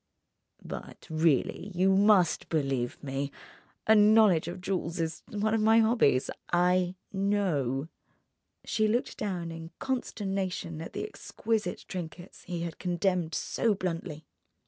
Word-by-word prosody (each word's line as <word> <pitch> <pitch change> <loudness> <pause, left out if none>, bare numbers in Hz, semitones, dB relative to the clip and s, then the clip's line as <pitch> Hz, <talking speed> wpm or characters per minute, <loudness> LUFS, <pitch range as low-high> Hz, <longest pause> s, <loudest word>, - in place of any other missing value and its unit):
"But - - -8
really, 160 +4 +1
you 190 +2 +4
must 195 -4 +4
believe 135 -6 -1
me. 140 0 -3 0.5
A 220 - +6
knowledge 210 -6 +6
of 175 +2 -5
jewels 180 -2 -2
is 160 -1 -2
one 215 +1 0
of 225 - +2
my 220 +1 +5
hobbies: 220 - +3 0.2
I 180 +1 +3 0.2
know!" 175 -10 0 0.8
She 215 0 +1
looked 235 +4 0
down 180 -5 -3
in 165 0 -8
consternation 195 -9 -3
at 165 - -7
the - - -3
exquisite 225 - -3
trinkets 175 0 -7
he 175 -1 -4
had 170 -1 -6
condemned 180 -2 0
so 225 -3 +1
bluntly. 165 -4 -4
180 Hz, 125 wpm, -29 LUFS, 165-205 Hz, 0.8 s, A